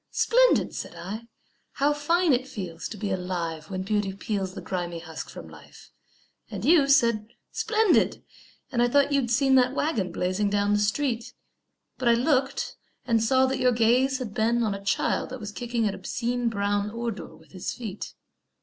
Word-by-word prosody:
"Splendid!" - - +3
said - - -6
I. 215 +6 -7 0.5
"How 285 +2 +2
fine 330 +2 +2
it 255 +1 0
feels 185 - -6
To 220 - -7
be 200 -1 -3
alive, 170 -4 -3
when 185 -1 -3
beauty 205 0 0
peels 195 -1 -3
The - - -5
grimy 175 -2 -3
husk 165 -1 -8
from - - -9
life." - - -15 0.6
And 205 -1 -5
you 300 -2 +5
Said, 235 -7 +3 0.2
"Splendid!" 440 -3 +2 0.5
and 240 -3 +1
I 240 - +4
thought 285 +3 +3
you'd 275 -4 +1
seen 265 +3 +3
That 255 0 +4
waggon 220 - 0
blazing 185 +4 0
down 205 0 +1
the 205 - +3
street; 230 +3 -1 0.7
But 255 - -1
I 235 - +6
looked 265 +2 0 0.3
and 225 -2 +2
saw 260 +3 +4
that 265 0 -1
your 250 -1 +3
gaze 245 +4 +3
had 245 -6 -6
been 235 +3 +1
On 215 -3 0
a 200 0 -7
child 195 - 0
that 260 0 -7
was 210 -2 -6
kicking 235 0 -1
an 200 - -1
obscene 235 +5 -2
Brown 205 -1 0
ordure 230 -1 -5
with - - -21
his 185 -2 -4
feet. 215 -5 -7
230 Hz, 180 wpm, -26 LUFS, 200-260 Hz, 0.7 s, I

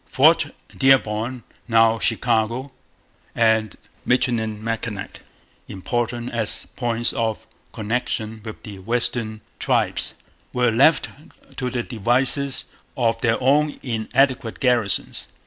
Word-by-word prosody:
Fort - - +4 0.3
Dearborn 125 -2 +2 0.2
(now 115 -1 +4
Chicago) 115 +3 +1 0.6
and 110 -3 +2 0.3
Michilimackinac, 115 -3 -1 0.5
important 120 +3 -3
as 110 -3 -2
points 120 -1 -1
of 110 -2 -2 0.3
connection 110 0 -3
with 110 -2 -9
the 100 -3 -9
western 115 0 -1 0.2
tribes, - - 0 0.4
were 125 -1 +2
left 140 +7 +4 0.5
to 125 -2 -1
the 125 -1 -2
devices 130 +4 +1 0.3
of 115 -3 +1
their 115 -3 +2
own 145 +3 +3
inadequate 120 0 0
garrisons. 120 -6 +1
115 Hz, 95 wpm, -22 LUFS, 110-125 Hz, 0.6 s, Fort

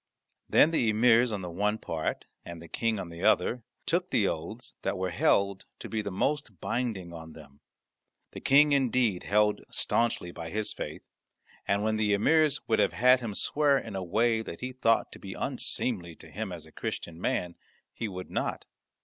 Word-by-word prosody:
Then 155 - +6
the 125 -9 +2
emirs 115 +2 +4
on 100 -3 -3
the 90 - -5
one 105 +5 0
part 80 -6 -3 0.2
and 85 -1 -8
the 85 - -11
King 115 +5 -1
on 90 - -5
the 85 0 -9
other 115 +7 +2 0.2
took 180 +2 0
the 100 - +2
oaths 95 +10 -5
that - - -2
were 95 0 -2
held 100 +3 +2
to - - -8
be 110 -1 -2
the 100 - -4
most 110 - -2
binding 105 -8 -3
on 80 -1 -9
them. 70 -3 -15 0.7
The - - -8
King 145 +2 +5
indeed 125 -8 +2
held 105 +1 +2
staunchly 115 -7 0
by 85 -1 -7
his 105 +4 -2
faith, - - -6 0.6
and 100 +1 +1
when 110 0 +1
the 105 -1 +2
emirs 155 +7 +3
would 110 - +2
have - - +3
had 125 +1 +5
him 115 -5 -5
swear 145 +3 +2
in 110 -6 -6
a 95 - -2
way 110 +5 +2
that 85 -6 -8
he 125 0 -3
thought 115 -3 +1
to - - -11
be 95 -1 -8
unseemly 115 -9 -1
to - - -15
him 105 -2 -4
as 85 -3 -7
a 80 - -17
Christian 85 +1 -5
man 90 -2 -1 0.4
he 115 - -4
would 90 -2 -7
not. - - -2
105 Hz, 190 wpm, -29 LUFS, 90-120 Hz, 0.7 s, Then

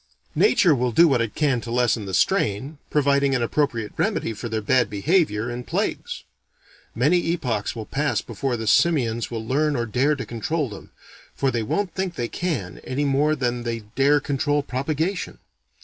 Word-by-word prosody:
Nature 185 - +4
will 125 -2 0
do 170 +9 +6
what 130 -6 +2
it 115 -2 -3
can 140 -6 +1
to 115 - -8
lessen 120 -3 +1
the 95 - -5
strain, 130 - 0
providing 140 -1 +2
an 125 - 0
appropriate 115 -4 -1
remedy 115 - 0
for 115 +3 -6
their 110 0 -1
bad 120 +4 +2
behavior 115 - +1
in 120 +1 -5
plagues. - - -3 0.7
Many 150 +10 +3
epochs 115 -12 -2
will 110 -2 -5
pass 145 +5 0
before 135 -3 -3
the 110 - -4
simians 120 0 +2
will 115 -2 -5
learn 145 +4 +1
or 120 -2 -1
dare 130 +7 +1
to 135 - -5
control 135 +5 -2
them 100 - -10 0.5
for 135 -1 +1
they 120 - -1
won't 180 - -1
think 190 -2 -3
they 120 -4 -2
can, 130 - -3
any 140 +3 -2
more 145 +2 +2
than 125 -3 -1
they 115 -1 -3
dare 145 +2 +4
control 145 +1 0
propagation. 155 +8 -2
130 Hz, 180 wpm, -23 LUFS, 115-150 Hz, 0.7 s, do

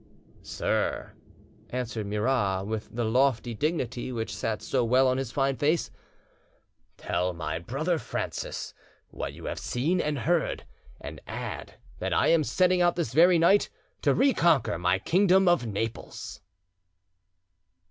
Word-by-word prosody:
"Sir," - - -2 0.6
answered 120 -4 -4
Murat, 105 -3 0
with 110 +1 -4
the 120 +1 -2
lofty 120 0 +2
dignity 130 -2 -2
which 115 -3 -4
sat 110 +1 -3
so 130 -2 0
well 130 +3 +4
on 130 0 +1
his 130 -3 -4
fine 135 0 +1
face, 155 +4 +1 1.1
"tell 90 +1 -1
my 80 -1 -4
brother 155 - -1
Francis - - -4 0.4
what - - -5
you - - -11
have - - -4
seen 160 +9 0
and 150 -1 -1
heard, 165 +4 0 0.3
and - - -8
add - - -6 0.2
that - - -2
I - - +3
am 165 -2 +4
setting 180 +7 +2
out 175 -1 +3
this 160 -9 -2
very 175 +4 +6
night 180 +5 +4 0.3
to - - +3
reconquer 170 - +3
my 90 +1 +2
kingdom 190 - +3
of 175 -9 +3
Naples." 110 +2 -5
130 Hz, 135 wpm, -27 LUFS, 110-165 Hz, 1.1 s, very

